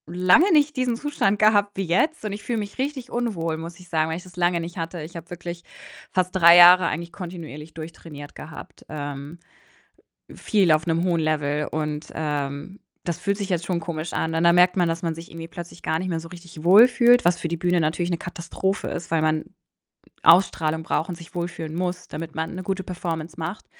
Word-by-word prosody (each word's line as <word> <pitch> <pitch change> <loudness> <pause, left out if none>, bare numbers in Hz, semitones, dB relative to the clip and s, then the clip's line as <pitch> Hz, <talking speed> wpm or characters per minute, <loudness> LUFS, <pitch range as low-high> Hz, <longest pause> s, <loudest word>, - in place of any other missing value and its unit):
lange 185 - +5
nicht 300 -1 +3
diesen 250 -2 +1
Zustand 235 -7 0
gehabt 205 -2 +3
wie 195 - 0
jetzt 215 - 0
und 210 - -2
ich 205 - -6
fühle 235 -2 -2
mich 205 -1 -6
richtig 265 -2 -3
unwohl, 175 -10 -2
muss 170 +2 -8
ich 180 - -16
sagen, 160 -1 +1
weil 160 - -2
ich 180 - -9
das 180 -2 -15
lange 175 -1 +2
nicht 170 +2 -7
hatte. 165 0 -4
Ich 170 +3 -10
habe 170 0 -9
wirklich 175 0 -7 0.5
fast 185 0 0
3 170 -1 +8
Jahre 180 0 +9
eigentlich 170 +2 -4
kontinuierlich 165 -4 -8
durchtrainiert 155 -2 -9
gehabt, 160 +1 -11
ähm, 145 +1 -6 1.0
viel 195 -6 +1
auf 155 +2 +2
'nem 165 0 +1
hohen 170 -3 +1
Level 150 -1 0
und, 150 0 -3
ähm, 145 +4 -4 0.3
das 170 - -2
fühlt 200 0 -1
sich 200 -1 -5
jetzt 170 -2 -1
schon 175 -2 -1
komisch 165 -1 -5
an 160 0 -1
und 165 - +1
dann 170 0 +6
merkt 180 +1 +5
man, 175 -2 +3
dass 165 0 -2
man 165 -2 -1
sich 165 +1 -10
irgendwie 165 0 -8
plötzlich 175 0 -10
gar 160 - 0
nicht 185 - -3
mehr 165 -2 -2
so 165 - -10
richtig 170 -2 -12
wohl 205 +8 +8
fühlt, 245 -1 +4
was 175 0 +3
für 165 - -3
die 170 - -2
Bühne 175 +1 +1
natürlich 165 +3 0
'ne 170 - +1
Katastrophe 180 +3 -3
ist, 170 - -6
weil 165 -1 +2
man 155 0 +1 0.8
Ausstrahlung 160 -2 +4
braucht 165 +2 -1
und 175 - -4
sich 170 0 -14
wohlfühlen 170 -2 -4
muss, 180 +1 -3
damit 160 0 -6
man 160 +2 -3
'ne 185 - -5
gute 190 0 -2
Performance 170 -3 -5
macht. 170 +6 -5
170 Hz, 215 wpm, -24 LUFS, 160-185 Hz, 1.0 s, Jahre